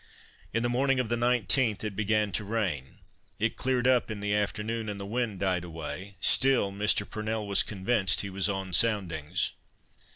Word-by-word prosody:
In 115 +2 0
the - - +2
morning 130 +2 +1
of 125 -3 -1
the 120 - +1
19th, 120 -1 +1
it 105 -2 -4
began 105 0 +1
to 105 - -2
rain; 95 - -3 0.4
it - - 0
cleared 125 -1 0
up 125 -2 +3
in 110 -2 -4
the 105 0 -1
afternoon, 105 +2 -1
and 100 -1 -5
the 100 - -5
wind 110 -2 -2
died 90 -2 +1
away; 85 +3 -7
still 130 -3 +3
Mr. 105 0 +1
Purnell 110 0 -3
was 100 -1 +3
convinced 95 -1 +1
he 100 - -5
was 95 +1 0
on 95 -2 -3
soundings. 90 -5 +1
105 Hz, 175 wpm, -28 LUFS, 95-115 Hz, 0.4 s, up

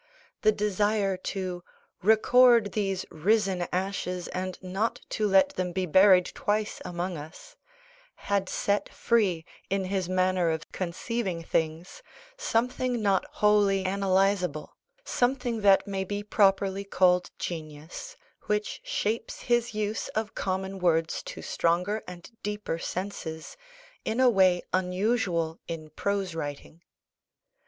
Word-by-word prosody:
The 215 - +5
desire 205 -1 +1
to 185 -1 -4 0.4
"record 230 +1 +5
these 195 -3 -1
risen 190 +1 +1
ashes 180 -1 -2
and 185 0 -4
not 190 +5 -2
to 215 - 0
let 190 -1 +5
them 180 -1 -3
be 185 +1 0
buried 185 +1 +6
twice 210 0 -1
among 180 0 -3
us," 160 - -11 0.6
had 200 -2 -1
set 205 0 0
free, 195 -9 +1 0.2
in 195 0 0
his 185 -1 -2
manner 185 -1 +2
of 160 -1 -3
conceiving 185 0 -3
things, 165 - -2 0.3
something 250 - 0
not 195 -2 +2
wholly 205 -2 +3
analysable, 190 -4 +1 0.4
something 245 -2 0
that 200 -1 +5
may 195 -2 -2
be 205 +2 -4
properly 195 -1 +2
called 180 -2 +3
genius, 160 - -7 0.3
which 210 0 -1
shapes 220 +3 -2
his 240 -2 +1
use 215 0 -2
of 220 -1 -2
common 190 0 -3
words 165 -2 +1
to - - -8
stronger 180 +6 0
and 180 +3 -10
deeper 210 -5 -3
senses, 170 - -5 0.5
in 225 +3 -2
a 255 -1 +6
way 185 -4 +4
unusual 180 -3 0
in 155 -2 -6
prose 195 +2 -2
writing. 150 +1 -6
190 Hz, 120 wpm, -28 LUFS, 180-210 Hz, 0.6 s, buried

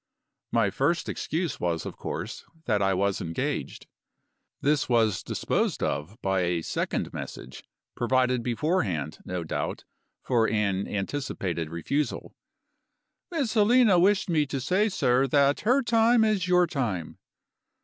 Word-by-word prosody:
My 115 -4 +2
first 165 - 0
excuse 165 -2 -2
was 85 -2 -1
of - - -6
course - - -5 0.2
that 105 -4 +1
I 95 -1 +2
was 100 +1 0
engaged. 80 0 -3 0.7
This 145 -1 +1
was 115 -4 +2
disposed - - -1
of 80 - -3
by 95 -1 +1
a 85 -2 0
second - - -2
message, 65 - -8 0.3
provided 125 0 +1
beforehand, 115 - -1
no 90 -2 -3
doubt, 80 - -3 0.4
for 115 -3 +2
an 100 -3 0
anticipated 95 - -3
refusal: 140 - -2 1.0
"Miss 295 -10 -1
Helena 220 -3 +5
wished 195 +3 +3
me 155 -4 +1
to 135 0 -3
say, 185 - +1
sir, 130 -7 +2
that 140 +1 +3
her 255 +5 +2
time 230 0 +4
is 210 -5 +1
your 180 0 +4
time." 115 - -3
125 Hz, 130 wpm, -27 LUFS, -, 1.0 s, Helena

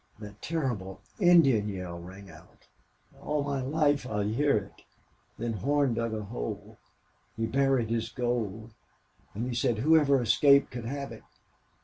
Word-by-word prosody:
That 105 -1 -11
terrible 125 - -3 0.2
Indian 145 - +5
yell 90 -3 -6
rang 95 +3 -11
out. 80 - -18 0.5
All 150 -1 -1
my 140 -1 -2
life 145 0 +1
I'll 105 -4 -2
hear 115 +7 +1
it!... 100 -2 -8 0.5
Then 115 0 -3
Horn 140 +4 +1
dug 115 -1 -2
a 110 - -4
hole. - - -6 0.6
He 115 - 0
buried 130 -2 +1
his 115 -1 -1
gold.... 115 -3 -3 0.6
And 115 +4 -3
he 125 - -3
said 120 -1 0
whoever 145 +1 +4
escaped 140 +5 +4
could 120 -2 -6
have 140 +3 -5
it. - - -10
120 Hz, 145 wpm, -28 LUFS, 105-140 Hz, 0.6 s, Indian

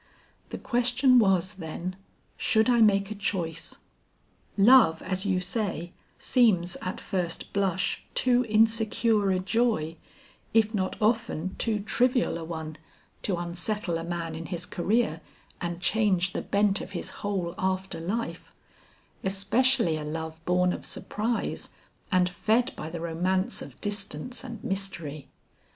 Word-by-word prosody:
The - - -5
question 250 +1 +3
was, 195 -2 +2
then, 180 0 -5 0.4
should 220 +2 +3
I 240 -1 +4
make 200 -2 +4
a - - -1
choice? 175 -5 -3 0.8
Love, 200 -6 +6
as 190 +2 -2
you 190 -2 +2
say, 180 -2 -2 0.3
seems 190 -8 +3
at 185 - -5
first 175 -3 -3
blush 190 -2 0
too 250 -1 +3
insecure 220 -1 +3
a 190 - +2
joy, 185 -5 0 0.6
if 220 0 +4
not 190 -3 -2
often 215 -5 0
too 225 -2 +1
trivial 245 -2 +1
a - - -6
one, 160 -1 -6 0.4
to 190 -4 -1
unsettle 175 +1 -2
a - - -5
man 170 -1 -4
in 160 +1 -6
his 175 -1 -4
career 185 -3 0 0.4
and 175 -1 -3
change 190 -3 +2
the - - -2
bent 200 0 +2
of 195 - -8
his 175 - -4
whole 190 -5 -2
after 190 -2 -1
life; 205 +8 -4 0.7
especially 200 0 +3
a 155 - -5
love 160 +1 -5
born 180 0 +2
of - - -6
surprise 225 +3 -3 0.4
and 180 -1 +4
fed 225 +7 +1
by 155 - -6
the 165 0 -6
romance 180 +3 0
of - - -10
distance 205 - -3
and 230 -5 -8
mystery. 170 -7 -4
190 Hz, 135 wpm, -27 LUFS, 170-220 Hz, 0.8 s, Love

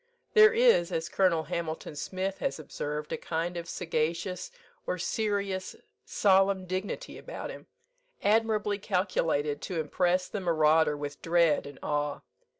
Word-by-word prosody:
There 430 -1 +8
is, 460 - +4
as 165 +1 -2
Colonel 180 -4 +2
Hamilton 160 -1 -4
Smith 190 +6 -3
has 275 - -1
observed, 150 0 -5
a - - -1
kind 170 +2 -3
of 170 -1 -5
sagacious, 170 +2 -2 0.4
or 180 - -1
serious, 200 0 -2 0.3
solemn 195 -1 +3
dignity 190 - -4
about - - -6
him, - - -11 0.6
admirably 210 -1 +2
calculated 165 -7 0
to 175 -3 -3
impress 180 +4 +1
the 210 - -4
marauder 160 -3 +3
with 145 0 -6
dread 165 -4 +3
and 145 - -10
awe. 145 -1 -1
175 Hz, 135 wpm, -29 LUFS, 160-195 Hz, 0.6 s, There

